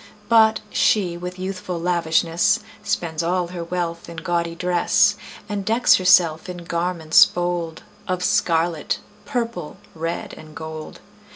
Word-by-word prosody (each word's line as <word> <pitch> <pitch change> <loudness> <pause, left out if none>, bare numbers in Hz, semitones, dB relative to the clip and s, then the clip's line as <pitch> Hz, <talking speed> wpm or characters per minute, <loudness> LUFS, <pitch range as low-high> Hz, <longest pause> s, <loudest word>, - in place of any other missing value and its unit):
But 220 -1 +5
she, 185 -5 +2
with 180 +1 -7
youthful 185 -2 -4
lavishness, 170 +2 +1 0.2
Spends 170 -6 -2
all 175 +1 0
her 175 -1 -5
wealth 170 -1 -4
in 170 - -9
gaudy 170 0 -2
dress, 180 +3 +2 0.3
And 205 -2 -3
decks 225 +5 +4
herself 180 -3 +4
in 175 -1 -7
garments 170 -2 +4
bold 175 -2 -3 0.2
Of 185 -1 -2
scarlet, 165 -2 +1 0.3
purple, 230 - -3 0.2
red, 165 +1 -4
and 155 -1 -13
gold. 160 -1 -8
175 Hz, 125 wpm, -22 LUFS, 165-185 Hz, 0.3 s, But